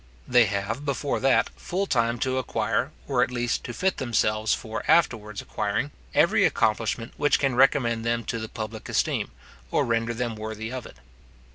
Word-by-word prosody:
They 120 -1 +6
have, 100 +6 -2
before 140 0 -1
that, 130 -3 +3
full 190 +3 -2
time 115 -7 +1
to 130 0 +1
acquire, 115 +2 -1 0.2
or 130 -3 +2
at - - +2
least 120 -1 -1
to - - -4
fit 185 +9 0
themselves 110 -4 +1
for 110 -1 -2
afterwards 105 -10 +2
acquiring, - - -2 0.2
every - - +4
accomplishment 115 +1 +1
which 145 0 +3
can 135 -2 +1
recommend 120 -3 +3
them 115 0 0
to 115 - -3
the 110 0 -5
public 110 -1 -6
esteem, - - 0 0.4
or - - +1
render 115 0 0
them 120 -1 -2
worthy 110 +1 -5
of 130 -2 -5
it. - - -15
115 Hz, 170 wpm, -26 LUFS, 110-130 Hz, 0.4 s, They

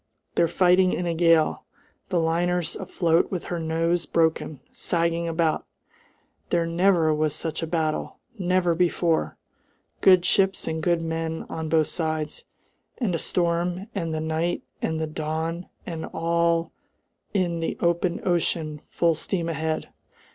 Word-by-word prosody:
They're 170 - +3
fighting 180 +2 +4
in 180 - -1
a 170 - 0
gale. 165 -1 +3 0.5
The 180 -3 +1
liner's 170 +1 0
afloat 170 -1 +1
with 180 -3 -3
her 175 - -3
nose 165 +2 0
broken, 160 -3 +1
sagging 170 0 0
about! 165 -1 0 0.8
There 170 -1 +2
never 170 -1 +3
was 155 -1 0
such 160 0 -3
a 165 - -2
battle! 160 -2 -1 0.2
never 180 -3 +2
before! 170 -1 +1 0.6
Good 185 -2 +6
ships 195 0 +2
and 160 0 -2
good 170 0 +1
men 160 0 -3
on 160 -1 -4
both 160 -1 +4
sides, 155 -2 -2 0.5
and 220 -8 0
a 165 - 0
storm 175 +4 0
and 165 -5 -2
the 155 - -2
night 160 +2 -1 0.2
and 160 0 -1
the 160 - 0
dawn 160 +3 -3 0.2
and 165 -2 -5
all 170 0 +1 0.6
in 175 -3 +1
the 165 - -2
open 170 0 +1
ocean 160 -3 0
full 170 -1 +2
steam 165 +2 -2
ahead! 160 0 -2
165 Hz, 140 wpm, -25 LUFS, 160-175 Hz, 0.8 s, Good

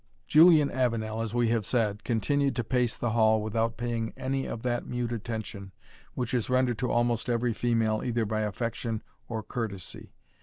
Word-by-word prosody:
Julian 155 -2 +6
Avenel, 115 -3 -1
as 115 0 -3
we 120 -1 +2
have 115 -2 +1
said, 105 -2 0
continued 135 +4 +1
to 120 - -1
pace 125 0 0
the 120 - -1
hall 110 -1 +4
without 115 +2 -1
paying 115 -1 -2
any 135 +1 -2
of 115 - -5
that 120 -1 -1
mute 120 -1 -2
attention 110 -4 -5 0.4
which 125 -1 -2
is 120 -2 0
rendered 125 -2 +2
to 125 -1 0
almost 120 0 +1
every 120 0 +1
female 115 -2 +1
either 120 -2 0
by 110 +1 -1
affection 110 +1 -2 0.3
or 110 -2 -3
courtesy. 105 -4 -5
115 Hz, 175 wpm, -28 LUFS, 110-125 Hz, 0.4 s, Julian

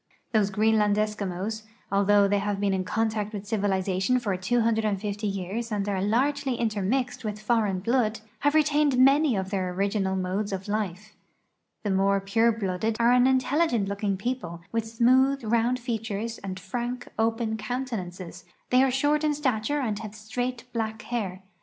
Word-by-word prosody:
These 210 -3 +3
Greenland 210 0 +3
Eskimos, 210 0 -2 0.3
although 200 0 +4
they 200 0 +2
have 200 0 -2
been 200 -1 +1
in 190 -1 0
contact 215 +1 -1
with 205 -1 -5
civilization 195 +1 +1
for 210 -6 -1
250 215 0 0
years 200 +4 -3
and 205 -1 -1
are 195 -2 -1
largely 260 +5 +1
intermixed 235 +3 -1
with 210 -1 -4
foreign 210 -4 +1
blood, 230 0 +1 0.2
have 290 +4 +2
retained 300 -3 +3
many 275 +1 +5
of 190 0 -3
their 185 -2 -1
original 195 +1 0
modes 190 +3 -2
of 195 0 -4
life 205 0 -3 0.7
The 205 - 0
more 195 +1 +3
pure 225 +4 +2
blooded 215 0 -2
are 235 +1 +4
an 250 +1 +5
intelligent 260 -3 +2
looking 200 -1 -1
people, 195 -6 -4
with 230 -1 -1
smooth, 255 +4 +3
round 235 +3 +2
features 225 -2 -4
and 190 -1 -6
frank, 240 +6 -4
open 225 0 +1
countenances; 210 -7 -5 0.3
they 250 +1 +6
are 265 - +4
short 290 +4 +1
in 300 -1 +2
stature 280 0 0
and 215 -5 -2
have 215 -2 -8
straight, 235 +3 -4
black 220 -2 -3
hair. 195 -6 -4
215 Hz, 160 wpm, -26 LUFS, 200-245 Hz, 0.7 s, they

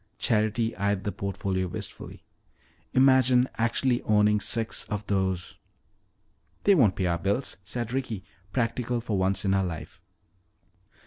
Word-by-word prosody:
Charity 110 0 +1
eyed 100 0 0
the 105 - -2
portfolio 95 -1 -2
wistfully. 90 - -7 0.7
"Imagine 130 -1 +5
actually 120 +2 +1
owning 105 0 +3
six 115 +2 -1
of 105 -1 -4
those 95 -2 -1 0.5
" - - -42
"They 200 - +6
won't 120 - +4
pay 95 - -1
our 85 -1 0
bills," 100 +9 0
said 115 +3 -4
Ricky, 120 -7 -3 0.3
practical 120 +1 -1
for 115 -2 -3
once 95 +1 +1
in 95 - +2
her 95 0 +2
life. 85 -4 -6
105 Hz, 135 wpm, -27 LUFS, 95-120 Hz, 0.7 s, They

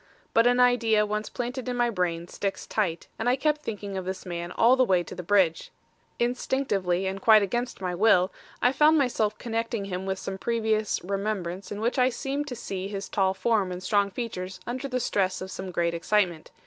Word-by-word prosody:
But 230 +1 +5
an 245 0 +3
idea 230 -4 +4
once 210 +1 -3
planted 250 +1 -4
in 245 - -2
my 240 -1 +2
brain 175 -4 -1
sticks 195 +2 -4
tight, 180 -6 -1
and 230 +2 +1
I 250 - +4
kept 300 +2 0
thinking 205 -6 -5
of 190 - -3
this 185 +1 -5
man 175 -1 -5
all 235 +6 +5
the 260 - +4
way 185 -7 +2
to - - -9
the 180 - -6
Bridge. 180 -2 +2 0.5
Instinctively 225 -7 0
and 190 +1 -3
quite 215 -1 +7
against 240 +3 -2
my 180 -1 -2
will, 185 -1 +4 0.3
I 245 - +5
found 300 +4 +5
myself 225 -6 +1
connecting 230 -2 -2
him 190 0 -4
with 190 0 -1
some 190 0 -5
previous 220 -2 0
remembrance 195 -1 -3
in 205 +1 -4
which 240 +3 0
I 250 0 +5
seemed 275 +3 -3
to 250 - -5
see 195 -4 -5
his 200 -1 -5
tall 190 -1 +1
form 205 -2 +1
and 180 +1 -6
strong 200 0 +2
features 190 -4 -5
under 255 +3 -4
the 255 -1 -1
stress 195 -5 0
of 190 0 -7
some 190 0 -6
great 170 -1 0
excitement. 175 -1 0
205 Hz, 205 wpm, -27 LUFS, 185-240 Hz, 0.5 s, quite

